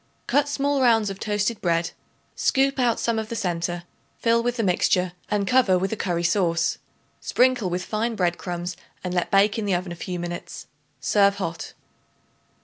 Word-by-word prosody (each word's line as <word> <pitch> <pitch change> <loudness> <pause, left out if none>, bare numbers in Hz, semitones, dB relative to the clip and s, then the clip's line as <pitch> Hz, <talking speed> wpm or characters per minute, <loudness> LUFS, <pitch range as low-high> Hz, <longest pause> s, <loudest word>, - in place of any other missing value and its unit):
Cut 285 +1 +2
small 285 -1 0
rounds 225 -5 +4
of 195 - -8
toasted 210 +1 -1
bread; 170 -1 +1 0.4
scoop 275 0 +2
out 240 -3 +2
some 230 -1 0
of 220 -1 -5
the 230 - -4
centre; 175 -3 -2 0.3
fill 230 0 +2
with 245 +1 -1
the 230 - 0
mixture 180 -1 +2 0.2
and 205 -1 0
cover 230 -5 +4
with 190 +1 -1
a - - 0
curry 175 -5 -1
sauce. 170 -2 +1 0.4
Sprinkle 250 -6 +2
with 180 +1 -3
fine 225 +2 -1
bread 175 -3 0
crumbs 175 0 -4 0.3
and 180 -1 -3
let 175 -1 0
bake 200 +2 +3
in 215 - -2
the 195 -3 +1
oven 175 0 -3
a - - -5
few 180 +1 -5
minutes. 175 0 -6 0.4
Serve 200 +9 +3
hot. 170 -4 -5
200 Hz, 180 wpm, -24 LUFS, 175-230 Hz, 0.4 s, rounds